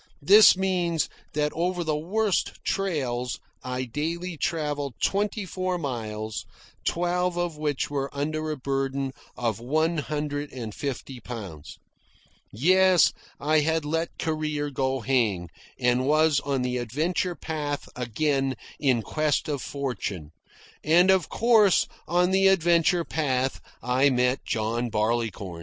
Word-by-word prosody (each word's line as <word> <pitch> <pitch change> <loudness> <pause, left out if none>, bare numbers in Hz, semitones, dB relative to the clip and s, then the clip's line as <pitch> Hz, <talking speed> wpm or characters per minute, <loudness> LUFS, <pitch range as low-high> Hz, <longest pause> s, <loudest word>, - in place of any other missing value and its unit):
This 200 +4 +8
means 175 -4 0 0.2
that 150 0 0
over 175 +1 -1
the 155 -2 0
worst 195 +6 0
trails 130 -11 -1 0.3
I 125 0 -3
daily 165 +8 -3
travelled 145 -4 -2
twenty 205 +1 0
four 185 0 -2
miles, 110 -7 -4 0.4
twelve 175 +1 0
of 175 -2 -1
which 150 -2 -2
were 140 -1 -1
under 155 +2 -2
a 155 - -2
burden 135 0 -2 0.2
of 115 -3 -1
one 155 +7 +1
hundred 145 0 -3
and 115 -5 -6
fifty 135 -1 -5
pounds. 100 -11 -8 0.7
Yes, 185 - +4 0.3
I 155 +2 +3
had 160 +1 0
let 165 +2 -2
career 155 -2 -2
go 135 -1 -1
hang, 110 -9 +1 0.3
and 125 +1 +2
was 155 -1 +4
on 135 -2 -1
the 125 0 -1
adventure 155 +9 -1
path 145 -2 -4
again 135 +3 0 0.2
in 130 -6 +2
quest 155 +4 0
of 145 -4 -2
fortune. 115 - -4 0.5
And 175 +5 +5
of 190 -5 +2
course, 220 -5 +4 0.2
on 180 +2 +2
the 195 0 +4
adventure 175 -2 +3
path, 135 -4 -1 0.2
I 130 +3 +3
met 125 0 +1
John 115 +2 -1
Barleycorn. 105 -5 -1
145 Hz, 130 wpm, -26 LUFS, 125-170 Hz, 0.7 s, This